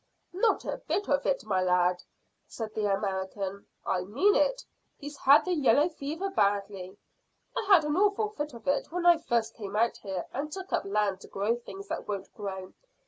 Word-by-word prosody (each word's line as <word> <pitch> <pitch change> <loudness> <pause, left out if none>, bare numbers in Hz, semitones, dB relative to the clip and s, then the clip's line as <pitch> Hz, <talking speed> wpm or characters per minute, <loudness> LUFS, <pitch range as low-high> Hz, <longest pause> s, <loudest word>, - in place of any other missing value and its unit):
"Not 420 +5 +1
a - - -4
bit 405 - 0
of 280 -1 +1
it, 270 -5 0
my 190 -3 +1
lad," 180 0 +2 0.5
said 220 -2 -6
the 210 -2 0
American. 195 0 -3 0.2
"I 185 - 0
mean 270 - +3
it. - - +2 0.3
He's 290 0 -8
had 280 +1 +5
the 365 - 0
yellow 290 0 +4
fever 325 +5 -4
badly. 200 - 0 0.6
I - - -1
had 370 -6 +6
an 300 0 0
awful 415 +3 +2
fit 295 - -5
of 235 - -12
it 280 +2 0
when 355 +1 -2
I 345 -2 +7
first 230 -6 0
came 205 -3 -7
out 230 +2 +2
here 190 -3 -5
and 295 +3 -3
took 380 +3 -7
up - - +1
land 200 -1 0
to - - -11
grow 205 +4 0
things 200 -4 -10
that - - -4
won't 200 -2 -5
grow. 190 -3 -6
230 Hz, 195 wpm, -29 LUFS, 195-315 Hz, 0.6 s, I